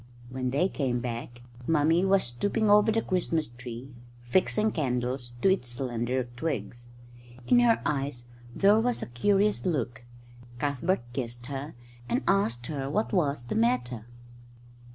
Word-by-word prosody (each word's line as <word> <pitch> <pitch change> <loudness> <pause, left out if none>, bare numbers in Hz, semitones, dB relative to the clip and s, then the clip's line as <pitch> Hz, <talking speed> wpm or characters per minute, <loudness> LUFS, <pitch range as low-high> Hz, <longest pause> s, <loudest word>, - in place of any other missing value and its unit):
When 130 0 -2
they 145 +8 +2
came 130 -9 -1
back 120 0 -5 0.2
Mummy 165 +2 +3
was 195 0 +4
stooping 205 - 0
over 210 +1 +6
the 225 +1 +1
Christmas 165 -5 0
tree, 120 +2 -9 0.3
fixing 190 - +2
candles 125 -4 -2
to - - +6
its 190 -10 +1
slender 125 0 -1
twigs. 125 -4 -4 0.6
In 245 - +5
her 235 -2 +4
eyes 135 -4 -2 0.3
there 205 +2 +5
was 245 +1 0
a - - -3
curious 200 - +2
look. 120 -9 -2 0.5
Cuthbert 145 +5 0
kissed 120 -2 -4
her 140 +2 -6 0.3
and 255 - 0
asked 120 - +2
her 140 -2 -3
what 215 +10 -1
was 145 -9 +1
the 120 - -3
matter. 120 0 0
135 Hz, 140 wpm, -28 LUFS, 120-190 Hz, 0.6 s, over